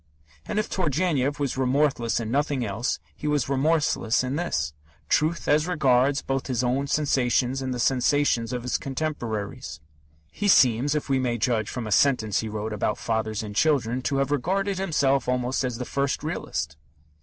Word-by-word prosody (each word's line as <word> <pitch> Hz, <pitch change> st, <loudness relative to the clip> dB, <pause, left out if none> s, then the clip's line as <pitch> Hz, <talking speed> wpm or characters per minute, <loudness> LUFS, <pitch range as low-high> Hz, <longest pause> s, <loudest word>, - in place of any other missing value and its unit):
And -, -, -3 dB
if 215 Hz, -, +1 dB
Turgenev 150 Hz, -5 st, 0 dB
was 140 Hz, -2 st, -1 dB
remorseless 130 Hz, -3 st, +1 dB
in 115 Hz, -1 st, -4 dB
nothing 140 Hz, -2 st, 0 dB
else, 110 Hz, +5 st, -2 dB, 0.2 s
he 150 Hz, -, -5 dB
was 145 Hz, -4 st, +1 dB
remorseless 140 Hz, -4 st, +1 dB
in 130 Hz, +2 st, -2 dB
this 165 Hz, -, -1 dB, 0.4 s
truth 160 Hz, +3 st, +1 dB
as 150 Hz, +3 st, +3 dB
regards 140 Hz, -5 st, +2 dB
both 135 Hz, -1 st, -2 dB
his 125 Hz, -2 st, -1 dB
own 130 Hz, +3 st, 0 dB
sensations 135 Hz, -3 st, +1 dB
and 130 Hz, -1 st, -3 dB
the 125 Hz, -, -2 dB
sensations 125 Hz, -1 st, +2 dB
of 125 Hz, -1 st, -3 dB
his 125 Hz, -, -1 dB
contemporaries. 125 Hz, -8 st, -4 dB, 0.5 s
He 205 Hz, -, -2 dB
seems, 130 Hz, -, +4 dB
if 150 Hz, -, -2 dB
we 135 Hz, -2 st, +1 dB
may 120 Hz, -2 st, 0 dB
judge 110 Hz, -1 st, 0 dB
from 125 Hz, -3 st, -4 dB
a 110 Hz, -, -5 dB
sentence 110 Hz, -3 st, +3 dB
he 110 Hz, -, -3 dB
wrote 110 Hz, +1 st, -4 dB
about 105 Hz, 0 st, -1 dB
Fathers 110 Hz, -1 st, -2 dB
and 105 Hz, -1 st, -7 dB
Children, 130 Hz, -3 st, +2 dB
to 135 Hz, -, -1 dB
have 140 Hz, +1 st, 0 dB
regarded 190 Hz, +7 st, 0 dB
himself 140 Hz, -8 st, +1 dB
almost 125 Hz, +1 st, 0 dB
as 125 Hz, -2 st, -2 dB
the 125 Hz, -, -4 dB
first 140 Hz, +1 st, -1 dB
realist. 75 Hz, -, -4 dB
130 Hz, 175 wpm, -25 LUFS, 120-145 Hz, 0.5 s, seems